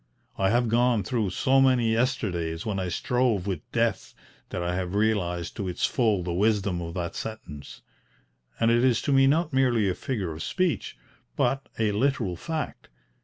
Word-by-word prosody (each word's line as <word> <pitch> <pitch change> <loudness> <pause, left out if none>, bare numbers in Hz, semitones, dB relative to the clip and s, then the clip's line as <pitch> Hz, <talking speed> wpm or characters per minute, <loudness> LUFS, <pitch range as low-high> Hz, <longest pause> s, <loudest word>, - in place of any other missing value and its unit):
I 95 0 +1
have 120 +3 +2
gone 120 -1 +2
through 115 -6 -1
so 135 +8 +3
many 125 -4 +3
yesterdays 95 -10 -1
when 105 -3 -2
I 95 - -2
strove 120 0 0
with 95 -3 -2
Death - - -1 0.3
that 90 - -3
I 85 0 -1
have 90 +1 -3
realised 100 -5 0
to 100 - -3
its 90 - -1
full 110 -7 +1
the 85 -1 -3
wisdom 100 -2 +1
of 85 -1 -6
that 85 -2 -3
sentence; 85 -11 -8 0.8
and 115 - +3
it 120 +1 +3
is 125 -3 +3
to 140 - +1
me 135 0 +5
not 155 +2 +1
merely 125 -6 +3
a 95 - +1
figure 100 -6 -3
of 80 - -8
speech, 185 - -1 0.4
but 135 0 0
a 110 -2 +1
literal 115 -4 0
fact. 155 - -5
110 Hz, 175 wpm, -26 LUFS, 90-125 Hz, 0.8 s, me